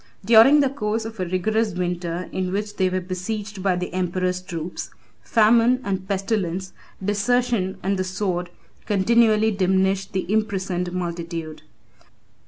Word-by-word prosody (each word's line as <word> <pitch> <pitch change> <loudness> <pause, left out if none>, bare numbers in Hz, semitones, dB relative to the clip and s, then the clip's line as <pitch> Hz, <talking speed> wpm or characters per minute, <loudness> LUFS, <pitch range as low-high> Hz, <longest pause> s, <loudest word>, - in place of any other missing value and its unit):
During 235 +7 +7
the 275 - +2
course 220 -4 -2
of 225 -2 -8
a 185 - 0
rigorous 210 +3 0
winter 175 -1 -3
in 185 -1 -2
which 205 +2 -3
they 185 -1 +2
were 185 0 -1
besieged 195 +3 -5
by 185 -1 +2
the 180 0 -4
emperor's 185 0 -1
troops, 175 -1 -6 0.3
famine 230 +3 +4
and 190 -1 -3
pestilence, 190 -2 -2 0.3
desertion 210 -1 +1
and 195 0 0
the - - +1
sword, 185 -2 -2 0.4
continually 220 +2 +3
diminished 190 0 +1
the 190 - -1
imprisoned 190 -4 -1
multitude. 170 -3 -5
190 Hz, 135 wpm, -23 LUFS, 180-215 Hz, 0.4 s, During